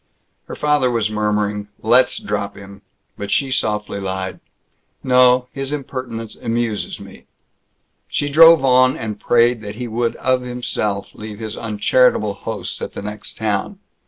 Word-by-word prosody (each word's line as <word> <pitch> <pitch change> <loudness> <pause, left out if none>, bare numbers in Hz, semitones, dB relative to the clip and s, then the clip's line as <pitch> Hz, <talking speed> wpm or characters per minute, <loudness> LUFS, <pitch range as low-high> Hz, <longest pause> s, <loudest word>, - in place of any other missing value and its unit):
Her - - -6
father 150 -3 +2
was 115 -3 0
murmuring, 105 -1 -1 0.2
"Let's 125 +3 +4
drop - - -3
him," 100 0 -12 0.4
but 100 0 -5
she 135 -2 +1
softly 105 -4 -1
lied, 95 -1 -4 0.6
"No. 125 -1 +5
His 135 0 -4
impertinence 130 -6 -5
amuses 115 -2 -2
me." - - -13 0.8
She 145 - -1
drove 165 0 +7
on, 130 0 +4
and 105 -2 -5
prayed 120 0 +3
that 105 -1 -7
he 125 +2 -5
would 115 +1 -1
of 130 0 +1
himself 120 -5 -3
leave 105 -1 -8
his 110 -1 -6
uncharitable 110 0 +2
hosts 100 - -6
at - - -5
the - - -7
next 105 0 -7
town. 110 - -2
115 Hz, 145 wpm, -19 LUFS, 105-130 Hz, 0.8 s, drove